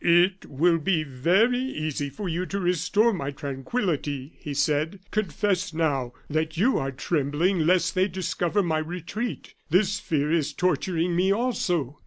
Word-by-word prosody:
"It 175 +3 +3
will 165 +4 +2
be 160 0 +1
very 180 - +2
easy 155 - -3
for 185 +9 -6
you 175 +2 -2
to 200 - -3
restore 180 +6 +2
my 140 -7 -3
tranquillity," 145 - -3
he 150 - -6
said. 150 +6 +1
"Confess 195 -1 -1
now, 140 -7 0
that 155 +2 -1
you 240 +9 +3
are 135 0 -2
trembling 155 +6 0
lest 180 0 +3
they 185 +1 +2
discover 185 +1 -1
my 160 -3 +1
retreat. 180 +8 -5 0.2
This 195 +5 +2
fear 150 -7 0
is 150 -3 +1
torturing 180 -1 0
me 185 +2 +3
also. 180 - 0
170 Hz, 150 wpm, -26 LUFS, 150-190 Hz, 0.2 s, It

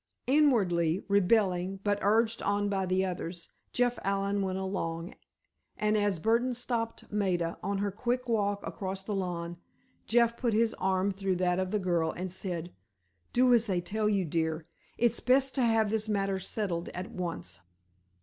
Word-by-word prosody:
Inwardly 200 - +3
rebelling, 195 -2 +2
but 205 -1 +1
urged 225 +3 +2
on 205 0 +1
by 195 -2 0
the 185 +1 +2
others, 175 -1 -5 0.2
Jeff 245 0 +1
Allen 200 +1 0
went 190 -1 -1
along, 175 -3 -3 0.6
and 210 0 +1
as 205 -3 +2
Burdon 235 +7 +1
stopped 230 -2 -3
Maida, 180 -5 0
on 200 0 -1
her 200 0 -1
quick 245 +4 -2
walk 205 -3 0
across 190 0 -4
the 210 - -4
lawn, 175 -3 -3 0.5
Jeff 235 0 +3
put 235 -4 0
his 230 0 +3
arm 190 +1 +1
through 195 -1 -1
that 180 0 +1
of 185 -1 -1
the 210 - +1
girl, 175 -4 +1
and 185 +1 -5
said: 175 -2 -4 0.6
"Do 250 0 +4
as 230 -1 +4
they 185 -3 +1
tell 210 +4 -1
you, 200 -3 +1
dear. 160 0 -1 0.3
It's 235 0 +2
best 265 +1 +3
to 270 - 0
have 225 -2 +3
this 220 0 -1
matter 195 -2 0
settled 185 -3 -3
at 180 +2 -5
once." 170 - -5
195 Hz, 165 wpm, -30 LUFS, 180-220 Hz, 0.6 s, Do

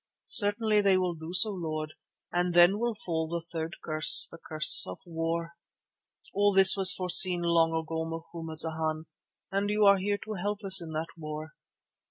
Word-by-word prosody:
"Certainly 210 0 +1
they 195 -2 +1
will 180 -1 -3
do 160 0 -11
so, 185 +4 +2
Lord, 155 -4 -7 0.4
and 175 0 -3
then 175 +4 +3
will 235 -1 -4
fall 160 -5 -6
the 170 +1 -6
third 165 0 -8
curse, 155 0 +5
the 165 - -14
curse 155 -1 +3
of 90 - -9
war. 165 0 -6 0.8
All 205 +1 0
this 195 -1 +8
was 190 -2 +6
foreseen 180 -1 +4
long 165 -1 0
ago, 160 0 -5
Macumazana, 160 -1 -4 0.5
and 200 +1 -3
you 210 0 -1
are 200 -1 +3
here 205 +2 -3
to 215 - -8
help 205 +2 -6
us 195 -1 +5
in 165 -1 -10
that 160 +1 -6
war. 155 0 -10
170 Hz, 170 wpm, -26 LUFS, 160-195 Hz, 0.8 s, this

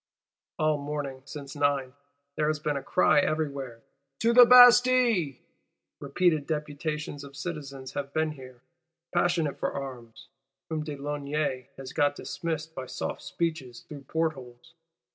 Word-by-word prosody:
All 155 -1 +1
morning, 140 -2 -5
since 140 0 -8
nine, 140 -3 0 0.4
there 150 - 0
has 155 0 +1
been 150 -1 -2
a 140 - -2
cry 135 - +3
everywhere: 140 -6 -2 0.4
To 230 +1 +3
the 245 0 +9
Bastille! 245 - +6 0.6
Repeated 165 -5 +1
"deputations 150 -1 -4
of 140 0 -12
citizens" 140 -6 -6
have 140 -1 -4
been 155 +1 0
here, 130 -4 -12 0.5
passionate 175 -4 +1
for - - -1
arms; 125 -5 -8 0.4
whom 155 -1 -2
de 150 -1 -5
Launay 145 -2 -3
has 135 -1 -8
got 145 0 +2
dismissed 160 0 -4
by 130 -3 -6
soft - - -5
speeches 160 -8 -4
through 140 -3 -11
portholes. 155 -2 -4
145 Hz, 135 wpm, -28 LUFS, 135-160 Hz, 0.6 s, the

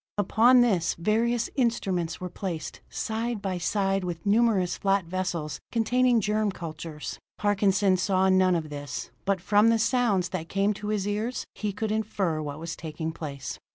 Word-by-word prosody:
Upon 230 +5 +5
this 195 -9 +2
various 225 +6 +1
instruments 195 - 0
were 185 - -4
placed, 175 -4 -5
side 225 +1 -2
by 190 -2 -3
side 195 +2 0
with 175 -1 -5
numerous 205 -4 +3
flat 195 -2 +1
vessels 170 -4 -3
containing 240 +1 +3
germ 210 0 +1
cultures. 160 -3 -7 0.2
Parkinson 200 -2 +2
saw 190 0 +2
none 185 -1 +4
of 155 -3 -3
this, 145 -1 -6
but 195 -1 +1
from 205 +4 +4
the 230 - +4
sounds 220 -6 +2
that 175 -3 -5
came 200 +2 +1
to 210 +1 -7
his 210 -2 -1
ears 215 +4 -2
he 210 -1 -3
could 215 +2 -3
infer 200 -7 -1
what 145 -1 -5
was 165 +1 -5
taking 160 0 -5
place. 140 -4 -6
195 Hz, 160 wpm, -27 LUFS, 170-215 Hz, 0.2 s, Upon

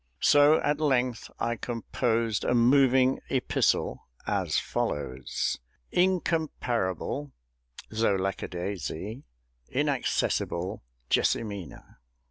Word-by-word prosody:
So 145 +2 +6
at 145 0 +1
length 130 -5 +1
I 120 0 0
composed 115 -1 -1
a 125 - +1
moving 130 +1 +4
epistle, 130 -2 0 0.2
as - - 0
follows: 65 -3 -2 0.3
INCOMPARABLE 145 - 0 0.6
THOUGH 110 -2 +2
LACK 95 0 -2
A - - -3
DAISY! 95 - -5 0.5
INACCESSIBLE 90 +3 0 0.3
JESSIMINA! 100 - -1
120 Hz, 85 wpm, -28 LUFS, 95-135 Hz, 0.6 s, So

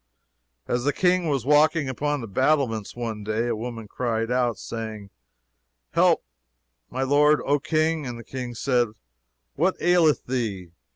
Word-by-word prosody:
As 120 0 0
the 145 +2 +1
King 180 -1 +2
was 135 -5 0
walking 150 +1 +4
upon 145 +2 -1
the 115 - -6
battlements 130 -2 0
one 115 -3 -4
day, 110 +3 -1
"a - - 0
woman 115 -1 -6
cried 115 0 -2
out, 125 -2 +1
saying, 110 -3 -6 0.8
Help, - - +3 0.7
my 130 +1 -2
lord, 145 +2 +4
O 145 +1 +2
King! 155 0 0
And 120 -1 -5
the 115 - -9
King 125 -2 -6
said, 125 0 +1 0.7
What 180 +6 0
aileth 175 -3 +3
thee? 105 -9 -3
125 Hz, 150 wpm, -25 LUFS, 115-150 Hz, 0.8 s, walking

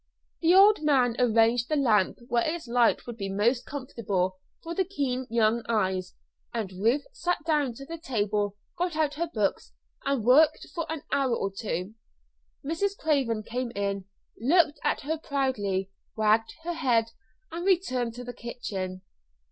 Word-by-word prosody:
The 340 +2 +5
old 405 -1 +7
man 260 -6 +3
arranged 230 0 +3
the 305 - +2
lamp 220 -9 +3
where 240 -2 +2
its 320 -2 -3
light 240 0 +3
would 240 -2 -7
be 195 -3 -4
most 230 +6 +1
comfortable 200 -9 -2 0.2
for 335 - -4
the 380 - +1
keen 265 -9 -2
young 230 0 +2
eyes, 190 -4 0 0.4
and 220 -5 -3
Ruth 230 +10 +1
sat 355 -7 0
down 295 -7 +1
to 275 - -9
the 330 +3 -7
table, 205 - -1 0.2
got 350 -2 0
out 305 -2 +1
her 335 +2 -2
books, 210 -3 -1 0.3
and 275 -5 0
worked 275 +7 +5
for 330 -3 -3
an 320 -3 -4
hour 265 -4 +2
or 195 -3 -2
two. 195 -1 -3 0.7
Mrs. 390 +7 -1
Craven 265 -8 +1
came 245 +2 -3
in, 200 -1 -2 0.3
looked 300 +5 +3
at - - +1
her 315 +3 -2
proudly, 205 -11 -1 0.3
wagged 220 +1 +2
her 345 +1 -2
head, 240 -8 +1 0.4
and 335 +2 -4
returned 255 -12 +1
to 245 - -7
the 245 0 -7
kitchen. 195 -6 -5
245 Hz, 160 wpm, -27 LUFS, 215-305 Hz, 0.7 s, old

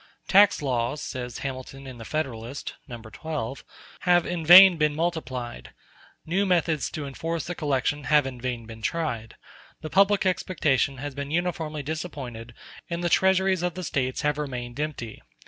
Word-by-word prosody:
"Tax 200 -4 +5
laws," 125 +1 -1
says 125 -4 -5
Hamilton 135 +1 -6
in 130 -3 -9
the 115 - -8
"Federalist" 135 -3 -4
(No. 120 -4 -7
12), 130 +4 -5 0.4
"have 175 -1 +3
in 175 -2 -3
vain 180 +3 +10
been 150 -1 +1
multiplied; 130 -8 -4 0.5
new 185 +5 +1
methods 170 -5 +1
to 150 - -5
enforce 165 +4 -4
the 175 - -4
collection 145 -2 -1
have 150 +2 +4
in 125 -2 -6
vain 120 -2 -3
been 110 0 -11
tried; 120 -6 -3 0.5
the 155 - -7
public 195 +1 +4
expectation 155 -7 +1
has 145 +2 -5
been 140 +1 -5
uniformly 160 -2 -2
disappointed 135 -7 -6 0.3
and 170 0 -3
the 175 - +1
treasuries 190 0 +3
of 180 -1 -2
the 185 - -5
States 130 -5 -1
have 150 0 0
remained 125 -3 -5
empty. 145 -7 -4
150 Hz, 160 wpm, -26 LUFS, 125-170 Hz, 0.5 s, vain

